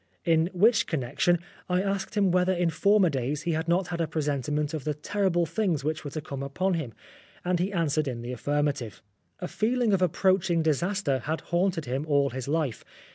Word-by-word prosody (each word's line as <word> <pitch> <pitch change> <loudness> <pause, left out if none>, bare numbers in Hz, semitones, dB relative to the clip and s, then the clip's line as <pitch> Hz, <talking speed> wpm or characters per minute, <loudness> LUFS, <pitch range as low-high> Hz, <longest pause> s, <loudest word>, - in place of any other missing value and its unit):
In 165 0 +3
which 210 +4 +3
connection 155 +4 +1 0.3
I 180 +1 +2
asked 200 +2 -2
him 195 -3 +3
whether 180 +1 +3
in 175 -2 +1
former 200 0 +3
days 140 +3 -2
he 170 - 0
had 160 +1 -1
not 175 +1 +1
had 170 -1 -2
a 165 - 0
presentiment 150 0 -1
of 155 -4 -3
the 150 -1 -2
terrible 175 +2 0
things 165 -3 -1
that 155 +1 -2
were 145 - -5
to 155 +2 -5
come 140 -3 -6
upon 180 +8 -1
him, 155 -9 -3 0.5
and 180 -1 +1
he 185 +3 0
answered 155 -5 0
in 120 -3 -4
the 120 - -5
affirma 145 +3 0
tive. 120 -7 -9 0.4
A 180 - -2
feeling 230 +1 +1
of 190 - +2
approaching 180 -1 +2
disaster 160 -1 0
had 160 +2 -2
haunted 175 -2 0
him 135 +5 -3
all 140 -2 +2
his 130 0 -5
life. 145 -5 -1
165 Hz, 200 wpm, -27 LUFS, 145-185 Hz, 0.5 s, In